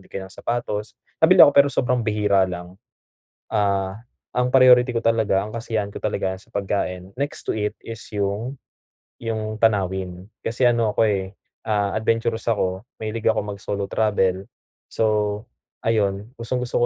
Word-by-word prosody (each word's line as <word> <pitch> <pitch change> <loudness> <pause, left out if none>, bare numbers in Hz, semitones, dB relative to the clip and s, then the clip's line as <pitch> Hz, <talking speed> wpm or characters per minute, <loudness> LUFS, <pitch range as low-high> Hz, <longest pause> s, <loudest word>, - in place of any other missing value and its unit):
di - - -20
kaya 95 - -6
ng 95 - -13
sapatos. 110 -3 -3 0.2
Mabili 180 +3 +9
ako 145 - +5
pero 140 0 +6
sobrang 125 -2 +1
bihira 105 -4 +2
lang, 90 +2 -8 0.7
ah, 100 -2 0 0.4
ang 125 0 +1
priority 125 -1 +6
ko 115 - 0
talaga, 110 -4 +2
ang 105 +3 -6
kasiyahan 110 -3 -2
ko 100 - -12
talaga 95 0 -1
sa 95 - -20
pagkain. 95 -1 -3
Next 140 +3 -4
to - - 0
it 105 -1 -1
is 115 -1 -8
yung 105 +6 -2 0.6
yung 110 -1 -3
tanawin, 95 -4 0 0.2
kasi 115 +3 -1
ano 115 -3 +1
ako, - - +1
eh, 95 -1 -2 0.3
ah, 105 -2 0
adventurous 115 +1 0
ako, 95 -2 0 0.2
mahilig 110 +1 -4
ako 110 -1 +3
mag-solo 100 -1 -4
travel, 95 -3 +1 0.4
so 105 -1 0 0.5
ayon, 105 -1 +1
gustong-gusto 120 +1 0
105 Hz, 150 wpm, -23 LUFS, 100-115 Hz, 0.7 s, Mabili